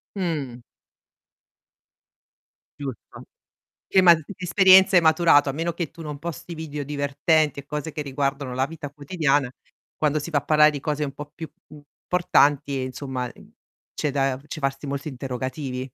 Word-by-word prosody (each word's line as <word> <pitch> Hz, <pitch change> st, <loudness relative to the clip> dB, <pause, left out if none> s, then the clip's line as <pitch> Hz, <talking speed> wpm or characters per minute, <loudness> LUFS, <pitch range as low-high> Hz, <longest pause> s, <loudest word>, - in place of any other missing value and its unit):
Mh. 150 Hz, -10 st, -3 dB, 2.2 s
Giusto. 135 Hz, -5 st, -8 dB, 0.6 s
Eh 190 Hz, -, +5 dB
ma, 175 Hz, -2 st, +8 dB
che 160 Hz, +4 st, -7 dB
esperienze 190 Hz, +1 st, +6 dB
hai 175 Hz, -, +6 dB
maturato, 160 Hz, -3 st, +5 dB
a -, -, -1 dB
meno 165 Hz, +4 st, -2 dB
che 170 Hz, -2 st, -4 dB
tu 165 Hz, 0 st, -11 dB
non 150 Hz, -2 st, -6 dB
posti 170 Hz, +1 st, -6 dB
video 150 Hz, -3 st, -5 dB
divertenti 145 Hz, +1 st, +1 dB
e 140 Hz, -, -8 dB
cose 150 Hz, +2 st, -4 dB
che 150 Hz, -, -6 dB
riguardano 140 Hz, -2 st, -2 dB
la 130 Hz, +1 st, +1 dB
vita 155 Hz, -2 st, -8 dB
quotidiana, 145 Hz, -3 st, 0 dB, 0.5 s
quando 155 Hz, 0 st, +1 dB
si 160 Hz, +4 st, -6 dB
va 150 Hz, -, +2 dB
a 145 Hz, -, -8 dB
parlare 150 Hz, 0 st, +5 dB
di 145 Hz, -, -5 dB
cose 150 Hz, +1 st, -3 dB
un 140 Hz, -2 st, -2 dB
po' 145 Hz, +1 st, -9 dB
più 160 Hz, -1 st, -8 dB, 0.2 s
importanti 145 Hz, -2 st, 0 dB
insomma, 130 Hz, -1 st, -4 dB
mh, 120 Hz, -, -9 dB, 0.6 s
c'è 150 Hz, -, -2 dB
da 135 Hz, -1 st, 0 dB
c'è 155 Hz, -, -7 dB
farsi 135 Hz, +1 st, -2 dB
molti 140 Hz, +2 st, -4 dB
interrogativi. 130 Hz, 0 st, -5 dB
145 Hz, 160 wpm, -24 LUFS, 135-160 Hz, 2.2 s, ma